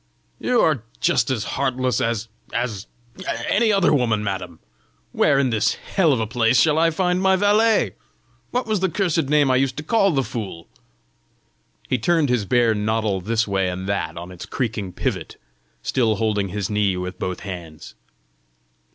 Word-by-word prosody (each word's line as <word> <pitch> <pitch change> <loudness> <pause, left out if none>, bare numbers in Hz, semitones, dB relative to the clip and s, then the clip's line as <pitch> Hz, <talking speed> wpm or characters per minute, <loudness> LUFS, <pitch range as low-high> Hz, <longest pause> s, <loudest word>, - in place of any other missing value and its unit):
"You 250 -1 +1
are 150 -7 +2 0.2
just - - +2
as 120 -5 -1
heartless 130 -1 -1
as 115 -1 -1 0.2
as 110 -4 -3 0.6
any 220 +1 +3
other 195 -5 +3
woman, 115 -6 +1
madam! 95 -4 -4 0.5
Where 140 -2 +3
in 135 -3 +2
this 110 -2 +1
hell 175 -6 +1
of 130 - +1
a 110 - 0
place 115 +2 +2
shall 155 -1 +4
I 165 0 +4
find 180 +2 0
my 190 0 +4
valet? 210 +3 +3 0.6
What 250 +1 -1
was 215 -3 0
the 190 0 +1
cursed 170 -3 0
name 145 -3 +4
I 130 - +4
used 130 -1 0
to 150 - -4
call 195 +4 +3
the 140 -6 +1
fool?" 100 -9 -6 1.2
He 125 - 0
turned 160 +2 +2
his 120 -5 +1
bare 120 +1 +3
noddle 105 -2 -1
this 115 +4 0
way 95 -2 0
and 95 +1 -5
that 85 -5 -2
on 85 +2 -7
its 90 -1 -9
creaking 110 -7 -3
pivot, - - -3 0.5
still 115 -4 +1
holding 105 -2 0
his 100 0 -3
knee 105 -3 +1
with 90 0 -5
both 90 -1 -3
hands. 85 -5 -8
115 Hz, 170 wpm, -22 LUFS, 100-155 Hz, 1.2 s, shall